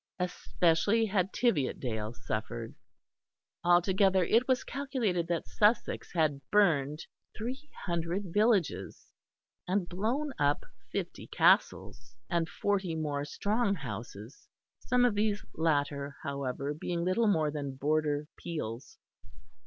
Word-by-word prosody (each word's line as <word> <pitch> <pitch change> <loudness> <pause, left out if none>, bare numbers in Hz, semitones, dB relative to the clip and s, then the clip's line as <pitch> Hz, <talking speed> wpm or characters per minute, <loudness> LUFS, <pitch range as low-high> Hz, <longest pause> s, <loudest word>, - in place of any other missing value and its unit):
Especially 180 +3 +2
had 190 -2 0
Tiviotdale 125 - 0
suffered. 115 +1 -4 0.9
Altogether 185 +2 +4
it 230 +8 +3
was 260 -2 +2
calculated 245 - -1
that 170 -2 -2
Sussex 210 +2 +1
had 155 -5 +1
burned 155 -7 +2 0.3
three 260 +7 -5 0.2
hundred 170 +1 -2
villages 200 - +1 0.6
and 185 0 0
blown 240 +11 -1
up 145 0 +2 0.3
fifty - - -4
castles, 115 +1 +2 0.2
and 170 -1 +1
forty 195 -5 -1
more 145 -3 -2
"strong 205 +7 0
houses," 110 - -8 0.3
some 250 0 +2
of 240 - +3
these 210 0 0
latter, 145 -3 0
however, 140 0 -3
being 170 +3 -3
little 220 +5 +2
more 160 -7 +2
than 140 -2 -4
border 150 +1 0
peels. 135 -9 -5
170 Hz, 110 wpm, -31 LUFS, 145-205 Hz, 0.9 s, Altogether